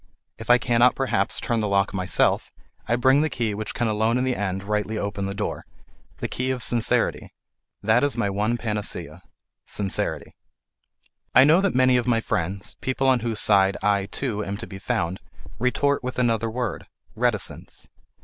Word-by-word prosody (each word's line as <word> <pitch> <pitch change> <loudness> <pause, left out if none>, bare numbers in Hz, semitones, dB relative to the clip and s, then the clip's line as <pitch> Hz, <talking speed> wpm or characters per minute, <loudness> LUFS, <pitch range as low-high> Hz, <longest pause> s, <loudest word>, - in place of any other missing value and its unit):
If 115 - -9
I 120 - +8
cannot 120 0 +3
perhaps 130 -7 0
turn 120 -1 -1
the 105 - 0
lock 100 0 +1
myself, 90 -2 +1 0.4
I 120 - +2
bring 130 +4 +4
the 155 - +1
key 115 -6 -2
which 110 +1 -5
can 120 - 0
alone 110 +2 +1
in 125 - 0
the 130 -1 0
end 95 -1 -3
rightly 105 +1 -2
open 100 -1 -3
the 100 - -4
door: - - -3 0.5
the - - -3
key 130 +1 -3
of 130 -2 -2
sincerity. 120 -2 0 0.5
That 110 +5 +3
is 145 -3 +1
my 115 - +1
one 105 +4 0
panacea: 105 -3 -4 0.4
sincerity. 100 -2 -3 1.0
I 130 - +9
know 160 +6 +5
that 200 -7 0
many 130 -1 +4
of 125 0 -1
my 115 -2 +3
friends, 100 -3 -3
people 130 +1 -1
on 130 -2 +4
whose 115 -2 -3
side 100 -2 +3
I, 100 -1 +2
too, 105 -3 -3
am 100 0 -4
to 115 - -6
be 95 -3 -9
found, 95 -5 -2 0.4
retort 140 +4 +1
with 125 0 -4
another 115 -2 +1
word: 120 -1 -4 0.3
reticence. 115 -4 -3
115 Hz, 180 wpm, -24 LUFS, 100-125 Hz, 1.0 s, I